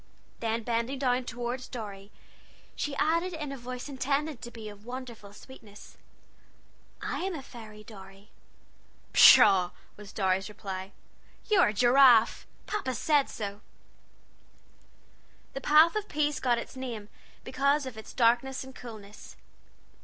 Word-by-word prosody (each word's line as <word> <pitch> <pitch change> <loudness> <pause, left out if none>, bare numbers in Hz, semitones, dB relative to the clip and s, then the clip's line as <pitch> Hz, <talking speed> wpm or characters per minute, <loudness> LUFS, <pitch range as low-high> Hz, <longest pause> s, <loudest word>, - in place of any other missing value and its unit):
Then 225 0 -2
bending 235 +3 -1
down 255 -1 0
toward 245 +1 -5
Dorry, 205 -5 -8 0.7
she 290 -1 -3
added 335 +5 0
in 300 -3 -5
a - - -5
voice 250 +2 -7
intended 280 0 -2
to 240 - -7
be 225 -2 -10
of 205 -1 -11
wonderful 240 -4 -8
sweetness: 210 -2 -14 1.1
"I - - -3
am 375 -1 -3
a 280 - -7
fairy, 215 -4 -12
Dorry!" 195 -1 -14 0.8
"Pshaw!" 190 -4 +8 0.3
was 210 -1 -11
Dorry's 190 -1 0
reply; 195 -2 -7 0.6
"you're 380 -4 +5
a 210 - -1
giraffe 240 0 +5 0.2
Pa 420 - -2
said 285 +4 +2
so!" 205 -1 -6 1.9
The 270 - -5
Path 310 +5 +5
of 425 -1 -3
Peace 295 0 0
got 245 -2 +1
its 235 - -7
name 240 -5 -6 0.4
because 280 +2 +1
of 260 -3 -7
its 220 - -10
darkness 245 +3 +1
and 265 0 -12
coolness. 215 -5 -11
240 Hz, 130 wpm, -28 LUFS, 210-275 Hz, 1.9 s, Pshaw